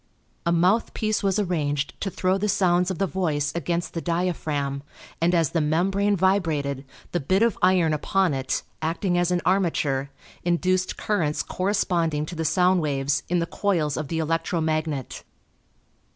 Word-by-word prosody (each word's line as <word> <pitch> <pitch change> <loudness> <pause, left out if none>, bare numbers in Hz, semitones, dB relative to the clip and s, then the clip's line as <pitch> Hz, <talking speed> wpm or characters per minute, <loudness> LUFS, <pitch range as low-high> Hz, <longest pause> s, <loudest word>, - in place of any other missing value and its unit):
A - - +3
mouthpiece 215 +4 +1
was 195 -1 +1
arranged 150 -8 -1
to 195 - -1
throw 185 +1 0
the 210 +1 0
sounds 180 -1 +2
of 190 - -3
the 195 - +1
voice 155 -6 -1
against 170 0 -2
the 165 - -3
diaphragm, 155 -6 -1 0.4
and 175 +2 +3
as 165 -4 +2
the 165 - +1
membrane 195 +7 +1
vibrated 160 -8 0 0.3
the 175 - 0
bit 185 +8 +2
of 230 -4 +2
iron 180 -4 +4
upon 185 +3 +1
it 130 -1 -2 0.2
acting 170 +3 -1
as 175 0 +2
an 180 -1 +1
armature 160 -7 +1 0.3
induced 185 +2 +1
currents 165 -8 0
corresponding 175 -6 0
to 175 - -8
the 160 0 -2
sound 180 +2 +3
waves, 140 -1 0
in 175 - +2
the 170 - +1
coils 170 -6 0
of 155 - -3
the 165 - -3
electro 165 +2 0
magnet. 155 -4 -2
170 Hz, 160 wpm, -24 LUFS, 155-185 Hz, 0.4 s, iron